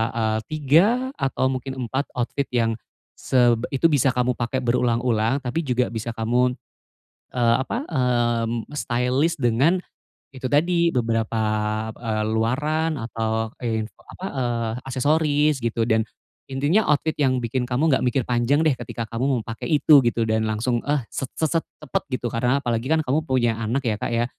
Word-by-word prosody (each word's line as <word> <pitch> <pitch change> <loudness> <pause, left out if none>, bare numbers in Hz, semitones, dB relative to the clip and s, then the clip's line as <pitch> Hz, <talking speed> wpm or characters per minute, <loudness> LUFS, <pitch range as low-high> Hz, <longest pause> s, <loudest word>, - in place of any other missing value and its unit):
eee, 110 -1 0
3 155 +4 +4 0.3
atau 135 -1 0
mungkin 130 +1 -4
4 130 +4 -2
outfit 125 +3 -2
yang, 115 -1 +1 0.4
seb 120 -2 +2
itu 165 +5 +3
bisa 135 -3 +2
kamu 125 0 +2
pakai 130 +2 -1
berulang-ulang 120 +1 +1
tapi 125 +5 -2
juga 125 -2 +1
bisa 115 0 -4
kamu, 125 +2 +1 0.8
eee, 120 -2 +3
apa, 240 - -4
eee, 120 -4 +1
mmm, 115 0 -2
stylish 130 +5 0
dengan, 135 +9 +3 0.5
itu 130 -2 -6
tadi, 170 +4 +2
beberapa 115 -2 0 0.5
eee, 110 -1 -3
luaran 150 +7 0
atau, 110 -1 -2 0.2
in 110 -1 0
e - - -48 0.2
apa, 190 - -6
eee, 120 -3 -1
aksesoris 145 +2 +2
gitu 115 -1 -1
dan, 110 0 +2 0.4
intinya 145 +11 +1
outfit 150 +2 +2
yang 130 -3 +2
bikin 125 +2 -1
kamu 130 +6 +1
nggak 130 - +3
mikir 125 +2 +1
panjang 125 +5 +2
deh 155 - +4
ketika 115 -1 -5
kamu 115 +3 -1
mau 130 -4 +1
pake 115 0 -6
itu, 150 -2 +6
gitu. 120 -2 0
Dan 110 0 0
langsung, 115 +3 0
eh, 145 -4 +1
set 135 - -3
set 160 +1 +1
set - - -23 0.2
cepat 150 - -3
gitu, 125 -3 -3
karena 125 +3 +1
apalagi 120 0 -1
kan 160 0 +2
kamu 140 +4 +1
punya 125 -4 +2
anak 115 +5 -1
ya 110 -3 -1
Kak - - -2
ya. 120 0 +1
125 Hz, 165 wpm, -23 LUFS, 115-140 Hz, 0.8 s, itu